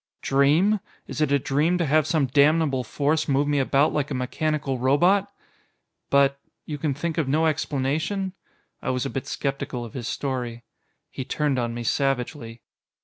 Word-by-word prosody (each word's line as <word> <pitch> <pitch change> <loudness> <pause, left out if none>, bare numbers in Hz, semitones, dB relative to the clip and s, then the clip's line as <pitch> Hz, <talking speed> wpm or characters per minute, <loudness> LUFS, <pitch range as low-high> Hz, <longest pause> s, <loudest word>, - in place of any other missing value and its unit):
"Dream! 155 +10 +3 0.3
Is - - -5
it 150 -2 +2
a 140 - +5
dream 150 +6 +1
to 170 - 0
have 155 +1 +3
some 155 -3 +2
damnable 140 0 +3
force 150 +6 0
move 140 0 +2
me 145 -1 +2
about 140 +2 +2
like 145 -2 -1
a 140 - -3
mechanical 135 +1 -1
robot?" 175 +10 +3 0.8
"But.... 140 0 +3 0.3
You 150 -2 -5
can 145 -2 -1
think 165 +3 -2
of 155 - 0
no 155 +4 +2
explanation?" 155 +6 -1 0.5
I - - -3
was 125 0 -1
a 135 - -3
bit 135 - -4
skeptical 140 -3 -3
of 115 - -11
his 120 -3 -5
story. 125 -4 -3 0.5
He 130 - -5
turned 140 0 0
on 120 -1 -2
me 120 - -4
savagely. 125 -2 -2
140 Hz, 170 wpm, -24 LUFS, 130-155 Hz, 0.8 s, a